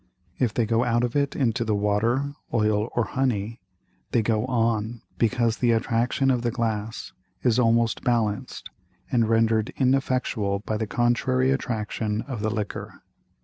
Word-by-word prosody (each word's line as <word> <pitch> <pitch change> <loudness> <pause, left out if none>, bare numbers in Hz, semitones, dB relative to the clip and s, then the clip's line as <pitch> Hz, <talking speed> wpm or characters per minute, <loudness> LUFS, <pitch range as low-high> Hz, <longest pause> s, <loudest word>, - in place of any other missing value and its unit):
If 125 -4 +2
they 115 +1 0
go 115 +2 +2
out 120 -1 +1
of 120 +1 -2
it 140 -1 +1
into 120 -2 +1
the 110 -2 0
Water, 115 +7 +1 0.2
Oil, 110 0 +1
or 120 - +2
Honey, 115 -3 -2 0.5
they 115 - +2
go 110 +2 0
on, 115 -2 0 0.2
because 115 0 +2
the 120 -2 +3
Attraction 115 +4 +1
of 125 -2 +1
the 120 - 0
Glass 110 -1 -3 0.3
is 120 -1 +3
almost 115 -1 +2
balanced 110 -4 -1 0.4
and 115 -3 +2
rendered 115 -1 +2
ineffectual 130 -6 +1
by 110 - -1
the 110 0 -2
contrary 130 +3 +1
Attraction 110 -4 -2
of 130 -7 -6
the 110 - 0
Liquor. 105 -1 -5
115 Hz, 150 wpm, -25 LUFS, 110-125 Hz, 0.5 s, the